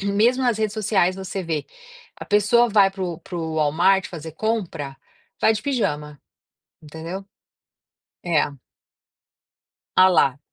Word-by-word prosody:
mesmo 220 Hz, +6 st, +2 dB
nas 240 Hz, -4 st, +1 dB
redes 215 Hz, -2 st, 0 dB
sociais 195 Hz, -4 st, +1 dB
você 190 Hz, 0 st, -5 dB
vê, 155 Hz, -3 st, -2 dB, 0.5 s
a -, -, -8 dB
pessoa 220 Hz, +4 st, +3 dB
vai 200 Hz, -3 st, +4 dB
para 195 Hz, 0 st, -7 dB
o 170 Hz, -3 st, -4 dB
para 180 Hz, -, -8 dB
o 160 Hz, -1 st, -3 dB
Walmart 170 Hz, +6 st, +3 dB
fazer 160 Hz, -2 st, -8 dB
compra, 165 Hz, -9 st, -3 dB, 0.4 s
vai -, -, +5 dB
de 215 Hz, -, -4 dB
pijama, 150 Hz, -, -2 dB, 0.6 s
entendeu? 160 Hz, +5 st, -7 dB, 1.0 s
É. 165 Hz, -5 st, +1 dB, 1.5 s
Olha 185 Hz, 0 st, +8 dB
lá, 140 Hz, -7 st, +3 dB
190 Hz, 130 wpm, -22 LUFS, 160-210 Hz, 1.5 s, Olha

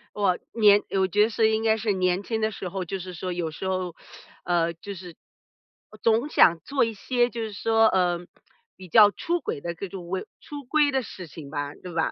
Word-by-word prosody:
我 195 Hz, -3 st, +1 dB, 0.2 s
年 205 Hz, -2 st, +6 dB
我 190 Hz, -1 st, +2 dB
觉 205 Hz, +3 st, +2 dB
得 220 Hz, -, -1 dB
是 220 Hz, -1 st, +2 dB
应 220 Hz, 0 st, 0 dB
该 220 Hz, -1 st, +3 dB
是 220 Hz, -1 st, 0 dB
年 185 Hz, 0 st, +1 dB
轻 220 Hz, +2 st, -3 dB
的 215 Hz, 0 st, +1 dB
时 195 Hz, -3 st, -6 dB
候 185 Hz, +1 st, -4 dB
就 190 Hz, +3 st, -4 dB
是 185 Hz, 0 st, -8 dB
说 180 Hz, +2 st, -4 dB
有 175 Hz, -2 st, -2 dB
时 155 Hz, +5 st, -6 dB
候， 185 Hz, -2 st, -2 dB, 0.5 s
呃， 170 Hz, -1 st, +1 dB
就 200 Hz, +5 st, -8 dB
是， 180 Hz, -2 st, -10 dB, 0.8 s
呃， 215 Hz, -, -15 dB
总 230 Hz, +5 st, +2 dB
想 170 Hz, -, +5 dB
做 275 Hz, -, +1 dB
一 225 Hz, -1 st, -3 dB
些 245 Hz, +4 st, 0 dB
就 235 Hz, -1 st, -5 dB
是 220 Hz, -1 st, -4 dB
说， 225 Hz, +2 st, +3 dB
嗯， 175 Hz, -2 st, 0 dB, 0.5 s
比 185 Hz, -, -12 dB
较 205 Hz, +4 st, +7 dB
出 340 Hz, +11 st, -2 dB
轨 145 Hz, -, -4 dB
的 170 Hz, +3 st, -4 dB
这 195 Hz, +3 st, -6 dB
种 180 Hz, -2 st, -8 dB
为 185 Hz, +1 st, -3 dB
出 290 Hz, -1 st, -9 dB
规 295 Hz, +3 st, +3 dB
的 265 Hz, -1 st, 0 dB
事 190 Hz, -5 st, -9 dB
情 150 Hz, -2 st, -11 dB
吧， 145 Hz, -1 st, -4 dB
对 180 Hz, -, -10 dB
吧？ 165 Hz, -1 st, 0 dB
195 Hz, 245 characters per minute, -25 LUFS, 175-225 Hz, 0.8 s, 较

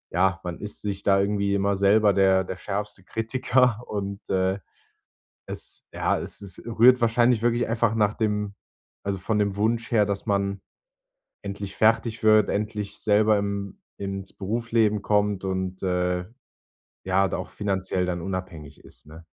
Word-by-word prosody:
ja, 95 Hz, +1 st, +2 dB
man 90 Hz, -1 st, -5 dB
ist 105 Hz, 0 st, -7 dB
sich 100 Hz, -2 st, -3 dB
da 100 Hz, -1 st, +4 dB
irgendwie 100 Hz, 0 st, +1 dB
immer 100 Hz, 0 st, +1 dB
selber 100 Hz, +1 st, +4 dB
der 95 Hz, -1 st, +4 dB
der 95 Hz, -, -6 dB
schärfste 100 Hz, 0 st, -5 dB
Kritiker 120 Hz, +2 st, +1 dB
und, 100 Hz, -1 st, -4 dB
äh, 95 Hz, +1 st, +1 dB, 0.9 s
es -, -, -8 dB
ja, -, -, 0 dB
es -, -, -7 dB
es 95 Hz, -3 st, -9 dB
rührt 120 Hz, +2 st, +5 dB
wahrscheinlich 115 Hz, 0 st, +3 dB
wirklich 120 Hz, 0 st, +1 dB
einfach 115 Hz, -1 st, +1 dB
nach 105 Hz, -2 st, +2 dB
dem 105 Hz, -2 st, -1 dB, 0.5 s
also 100 Hz, -1 st, -2 dB
von 105 Hz, +3 st, 0 dB
dem 100 Hz, -1 st, 0 dB
Wunsch 115 Hz, +2 st, 0 dB
her, 105 Hz, -3 st, +4 dB
dass 100 Hz, -1 st, -3 dB
man 100 Hz, -1 st, 0 dB, 0.8 s
endlich 100 Hz, 0 st, -6 dB
fertig 115 Hz, +1 st, +2 dB
wird, 110 Hz, -1 st, +5 dB
endlich 105 Hz, -1 st, -3 dB
selber 105 Hz, 0 st, +3 dB
im 100 Hz, -1 st, -4 dB, 0.2 s
ins 95 Hz, -1 st, -5 dB
Berufsleben 110 Hz, +1 st, 0 dB
kommt 105 Hz, -1 st, +1 dB
und, 95 Hz, -1 st, -3 dB
äh, 90 Hz, -1 st, 0 dB, 0.8 s
ja, 95 Hz, +1 st, +2 dB
da -, -, -2 dB
auch -, -, -5 dB
finanziell 95 Hz, -2 st, -1 dB
dann 90 Hz, -1 st, -2 dB
unabhängig 85 Hz, -6 st, -6 dB
ist, -, -, -16 dB
ne? 80 Hz, +2 st, -13 dB
100 Hz, 155 wpm, -25 LUFS, 95-110 Hz, 0.9 s, rührt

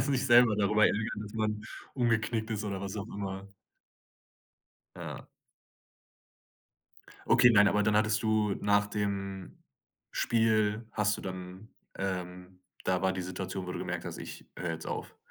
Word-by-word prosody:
sich 135 Hz, 0 st, +1 dB
selber 120 Hz, -3 st, +6 dB
darüber 105 Hz, +1 st, +4 dB
ärgern, 110 Hz, 0 st, 0 dB
dass 105 Hz, -, -9 dB
man 110 Hz, -1 st, -1 dB, 0.3 s
umgeknickt 115 Hz, -2 st, 0 dB
ist 110 Hz, -1 st, -2 dB
oder 100 Hz, -2 st, -3 dB
was 100 Hz, +1 st, -5 dB
auch 100 Hz, 0 st, -4 dB
immer. 100 Hz, -3 st, -5 dB, 1.5 s
Ja. -, -, -7 dB, 2.0 s
Okay, 125 Hz, -, +7 dB
nein, 105 Hz, -3 st, +6 dB
aber 105 Hz, +1 st, +2 dB
dann 105 Hz, +1 st, +2 dB
hattest 105 Hz, 0 st, +2 dB
du 110 Hz, -1 st, +2 dB
nach 105 Hz, 0 st, +3 dB
dem 100 Hz, -2 st, -3 dB, 0.5 s
Spiel 110 Hz, -1 st, +2 dB
hast 105 Hz, -1 st, +1 dB
du -, -, -9 dB
dann 95 Hz, +2 st, -7 dB, 0.3 s
ähm, 90 Hz, -1 st, -5 dB, 0.2 s
da 95 Hz, -1 st, +1 dB
war 95 Hz, 0 st, +1 dB
die 95 Hz, -, -3 dB
Situation, 95 Hz, +1 st, -5 dB
wo 90 Hz, -, -4 dB
du -, -, -4 dB
gemerkt -, -, -4 dB
hast: -, -, -6 dB
„Ich -, -, -9 dB
höre 85 Hz, -2 st, -2 dB
jetzt 80 Hz, -, -6 dB
auf“? -, -, -5 dB
105 Hz, 150 wpm, -30 LUFS, 95-110 Hz, 2.0 s, Okay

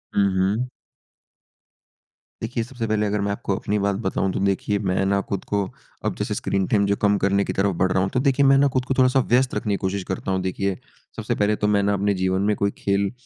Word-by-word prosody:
हुँ, 100 Hz, -1 st, +4 dB
हुँ। 105 Hz, +7 st, +1 dB, 1.8 s
देखिए, 115 Hz, -, -2 dB
सबसे 120 Hz, -2 st, -5 dB
पहले 105 Hz, 0 st, +1 dB
अगर 105 Hz, 0 st, 0 dB
मैं 100 Hz, 0 st, -1 dB
आपको 100 Hz, -1 st, -2 dB
अपनी 105 Hz, -, -1 dB
बात 100 Hz, 0 st, 0 dB
बताऊँ 95 Hz, -1 st, 0 dB
तो -, -, -2 dB
देखिए 100 Hz, +1 st, 0 dB
मैं 95 Hz, -1 st, 0 dB
ना 100 Hz, +1 st, +2 dB
खुद 100 Hz, -, -2 dB
को 100 Hz, -1 st, 0 dB, 0.4 s
अब -, -, 0 dB
जैसे -, -, -2 dB
स्क्रीन 95 Hz, -1 st, -1 dB
टाइम 100 Hz, -2 st, +2 dB
जो 100 Hz, 0 st, +1 dB
कम 105 Hz, 0 st, +3 dB
करने 100 Hz, +1 st, +2 dB
की -, -, -3 dB
तरफ़ 100 Hz, 0 st, +1 dB
बढ़ 95 Hz, 0 st, +2 dB
रहा 95 Hz, -, +2 dB
हूँ। 95 Hz, -, -1 dB
तो 125 Hz, -, +2 dB
देखिए 140 Hz, +1 st, +3 dB
मैंने 135 Hz, +1 st, +5 dB
कुछ 130 Hz, -, +2 dB
थोड़ा-सा 130 Hz, 0 st, +4 dB
व्यस्त 125 Hz, +1 st, +2 dB
रखने 105 Hz, -2 st, 0 dB
कोशिश 95 Hz, 0 st, -2 dB
करता 95 Hz, +1 st, -4 dB
हूँ 95 Hz, -, 0 dB
देखिए, 95 Hz, +1 st, -2 dB, 0.4 s
सबसे -, -, -2 dB
पहले 105 Hz, +1 st, +2 dB
तो 105 Hz, -, -1 dB
मैं 105 Hz, -1 st, +3 dB
ना 100 Hz, +1 st, +2 dB
अपने 100 Hz, +1 st, +1 dB
जीवन 95 Hz, 0 st, 0 dB
में 105 Hz, +1 st, +2 dB
कोई 100 Hz, 0 st, 0 dB
खेल 100 Hz, 0 st, 0 dB
100 Hz, 225 wpm, -23 LUFS, 95-105 Hz, 1.8 s, मैंने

